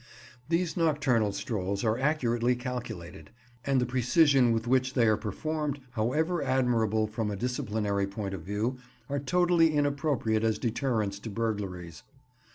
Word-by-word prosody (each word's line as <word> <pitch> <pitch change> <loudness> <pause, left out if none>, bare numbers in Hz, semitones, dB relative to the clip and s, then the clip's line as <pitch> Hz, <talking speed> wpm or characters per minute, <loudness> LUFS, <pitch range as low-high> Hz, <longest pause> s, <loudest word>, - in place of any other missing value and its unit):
These 170 -1 0
nocturnal 145 - +2
strolls 100 -1 -3
are 110 -1 +2
accurately 125 -3 +1
calculated, 120 - -6 0.3
and 135 -1 +2
the 125 - +1
precision 130 +1 +4
with 115 0 0
which 130 +1 +1
they 120 -3 +4
are 110 -1 +4
performed, 150 +7 -3
however 150 +10 0
admirable 115 -4 +1
from 110 0 -3
a 105 - -3
disciplinary 105 -3 -1
point 100 -1 -5
of 95 - -5
view, 105 +8 -2 0.3
are 140 0 -1
totally 175 +2 +3
inappropriate 140 -6 +1
as 110 -2 +1
deterrents 110 -4 -1
to 110 - -7
burglaries. 100 -7 -4
120 Hz, 140 wpm, -29 LUFS, 105-140 Hz, 0.3 s, precision